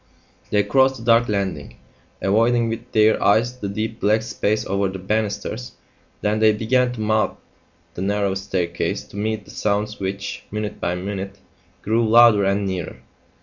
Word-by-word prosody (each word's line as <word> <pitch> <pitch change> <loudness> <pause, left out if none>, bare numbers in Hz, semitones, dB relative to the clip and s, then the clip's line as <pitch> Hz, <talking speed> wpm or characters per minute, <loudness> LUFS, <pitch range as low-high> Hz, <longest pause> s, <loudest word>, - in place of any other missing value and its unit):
They 105 -1 +2
crossed 130 +2 +3
the 115 - -10
dark 115 0 +4
landing, 95 -8 -3 0.5
avoiding 115 +3 +2
with 115 +2 -6
their 110 0 +3
eyes 120 +5 +2
the 100 - -4
deep 110 +3 -4
black 110 +2 +2
space 110 -1 -1
over 100 +1 0
the 95 - -6
banisters. 105 +4 -3 0.5
Then 105 +1 0
they 110 0 +5
began 125 +4 +1
to 115 - -6
mount 110 0 +1 0.6
the - - -6
narrow 100 0 0
staircase 95 -3 -2
to - - -14
meet 110 0 -2
the - - -13
sounds 105 +1 -1
which, 100 +1 -4
minute 105 0 -4
by 90 - -1
minute, 100 +1 -5 0.5
grew 110 +1 +1
louder 115 -3 +6
and 100 +1 +1
nearer. 95 -4 -4
105 Hz, 160 wpm, -21 LUFS, 100-115 Hz, 0.6 s, louder